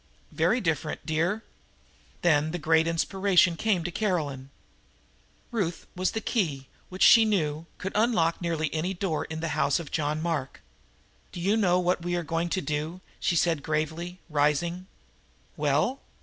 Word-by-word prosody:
"Very - - +2
different, 160 - -2
dear." 170 +7 0 0.8
Then 155 -3 +3
a - - 0
great 160 0 +3
inspiration 180 +1 +3
came 190 -1 +1
to 175 - -3
Caroline. 150 -10 -2 1.0
Ruth 180 -8 -2
was 185 +3 -1
a - - +1
key 150 - -1 0.2
which, 185 +1 -1
she 230 - +8
knew, 165 -7 0
could 195 - -4
unlock 210 -8 +2
nearly 165 -3 -1
any 175 +5 -1
door 175 -4 -2
in 160 0 -6
the 165 - -2
house 145 0 +1
of 165 -4 -8
John 150 -1 -1
Mark. 155 -5 -3 0.7
"Do - - -7
you 195 +5 +2
know 185 -5 +3
what 180 0 +1
we 175 +1 -2
are 175 - -1
going 165 +2 -1
to 185 - -1
do?" 155 +4 -3 0.2
she 175 - +1
asked 165 -4 0
gravely, 160 +4 -2
rising. 160 +4 0 0.7
"Well?" 150 - +1
170 Hz, 155 wpm, -27 LUFS, 155-185 Hz, 1.0 s, she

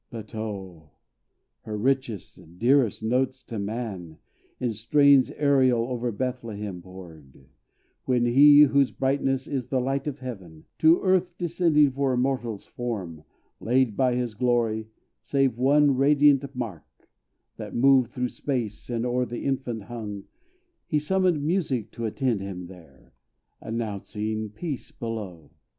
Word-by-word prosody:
But 110 -3 -9
oh! 95 -8 -6 0.7
her 105 -1 -5
richest, 110 -8 -3
dearest 120 -1 +2
notes 130 +3 0
to 115 -2 -6
man, 100 -6 -5 0.4
In 120 -3 -1
strains 140 +5 +4
aerial 130 -5 +2
over 120 -1 -2
Bethlehem 105 -6 -4
poured, 80 -8 -14 0.6
When 125 -2 +2
HE, 145 +4 +7
whose 140 -2 +3
brightness 135 0 0
is 130 -3 -3
the 130 0 0
light 135 +2 -2
of 145 -2 -3
heaven, 95 - -9
To 160 +2 +5
earth 185 -2 +1
descending 165 -4 +3
for 135 0 0
a - - 0
mortal's 125 -5 -2
form, 95 -11 -6 0.3
Laid 125 -2 +1
by 130 -2 +2
his 125 -2 -2
glory, 115 -1 0 0.3
save 130 0 0
one 140 +1 +4
radiant 140 0 +3
mark, 110 -10 -8 0.5
That - - -7
moved 130 -1 +4
through 125 +1 -3
space, 120 -8 -4
and 120 -1 -2
o'er 125 0 0
the 120 - -6
infant 130 -5 -2
hung, 105 -3 -7 0.6
He 155 - +1
summoned 175 0 +1
Music 150 - -1
to 115 - -5
attend 115 -1 -1
him 90 -2 -6
here, 80 -7 -17 0.5
Announcing 110 -1 -4
peace 140 - -6
below! 100 -10 -7
120 Hz, 135 wpm, -25 LUFS, 105-135 Hz, 0.7 s, HE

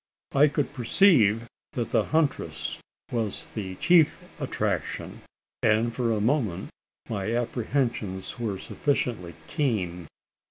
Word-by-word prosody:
I 145 +2 +6
could 145 -1 -1
perceive 120 - +4 0.3
that 115 -2 -2
the - - +3
huntress 85 - -1 0.3
was 115 -4 0
the 95 -4 -6
chief 170 - +4 0.2
attraction; - - -2 0.4
and 115 +2 +3
for 120 -2 +1
a 110 - +1
moment 110 - 0 0.4
my 110 +1 -2
apprehensions 120 -4 -2
were 110 -5 -2
sufficiently 120 - -1
keen. 95 - -1
115 Hz, 110 wpm, -27 LUFS, 100-140 Hz, 0.4 s, I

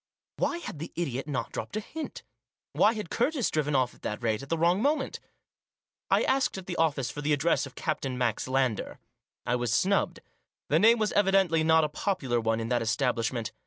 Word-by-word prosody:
Why 345 - 0
had 250 - -7
the 165 - -6
idiot 135 -5 -3
not 140 -4 -3
dropped - - -5
a - - +1
hint? 310 +8 -7 0.5
Why 215 - +4
had 210 -6 -6
Curtis 255 0 +1
driven 150 -2 0
off 130 -2 +2
at - - -22
that 105 +3 -4
rate 110 -2 0
at 135 - -10
the 165 - 0
wrong 175 +4 +3
moment? 285 +1 0 0.9
I - - +4
asked 265 -6 +1
at 190 - -7
the 180 - -4
office 145 -6 +1
for 145 - -6
the 150 +1 +1
address 145 0 +1
of 130 - -15
Captain 135 -5 -2
Max 120 -2 0
Lander. 130 -4 0 0.5
I 125 - +1
was 120 -2 -1
snubbed. 195 - +1 0.5
The - - +4
name 230 +2 +6
was 215 -2 0
evidently 195 -5 +3
not 160 0 +5
a - - +2
popular 150 - -1
one 115 0 0
in 115 0 -3
that 120 -1 +1
establishment. 115 -1 -1
150 Hz, 200 wpm, -28 LUFS, 125-195 Hz, 0.9 s, name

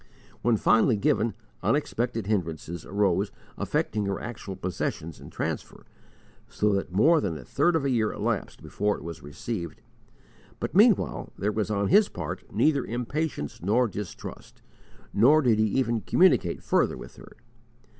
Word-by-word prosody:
When 120 -2 +3
finally 110 +2 +4
given, 110 +2 +1 0.3
unexpected 120 -6 0
hindrances 85 -5 -3
arose 100 0 +1 0.2
affecting 105 -1 -1
her 100 - -2
actual 105 -4 -6
possession 85 -3 -3
and - - -11
transfer, - - -4 0.6
so 105 -1 +1
that 100 -2 -1
more 150 - +4
than 85 -5 -2
a - - -10
third 165 +5 +2
of 150 -4 +1
a - - +2
year 110 -3 +1
elapsed - - -3
before 105 +1 -1
it - - -11
was 85 0 -7
received; 85 +5 -5 0.8
but - - -3
meanwhile 210 +1 +3
there 105 +3 0
was 110 0 -1
on 100 -2 0
his 210 0 +5
part - - -5
neither 145 -4 +2
impatience 125 - -3
nor 115 +7 +2
distrust, 105 -3 -8 0.5
nor 130 +9 +6
did 115 -4 +3
he 110 - +4
even 115 0 0
communicate 170 - +3
further - - +2
with - - -11
her. - - -14
110 Hz, 150 wpm, -27 LUFS, 95-125 Hz, 0.8 s, nor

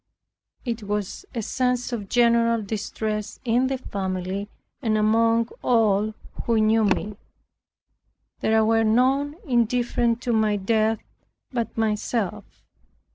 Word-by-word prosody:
It 235 -2 -3
was 210 - -4
a 230 - -2
scene 250 +3 +1
of 210 -5 -4
general 230 -2 +3
distress 215 0 -4
in 245 +2 +2
the 265 0 -1
family 190 -2 -4 0.3
and 220 -4 +1
among 225 +2 +3
all 215 -3 +2 0.3
who 230 -1 +2
knew 215 0 +3
me. 205 0 0 1.2
There 220 0 +3
were 225 0 +3
none 260 +6 +2
indifferent 240 -2 +1
to 240 - 0
my 215 -1 +2
death 220 +2 +1 0.6
but 235 -3 -3
myself. 215 -2 -2
225 Hz, 115 wpm, -24 LUFS, 210-235 Hz, 1.2 s, general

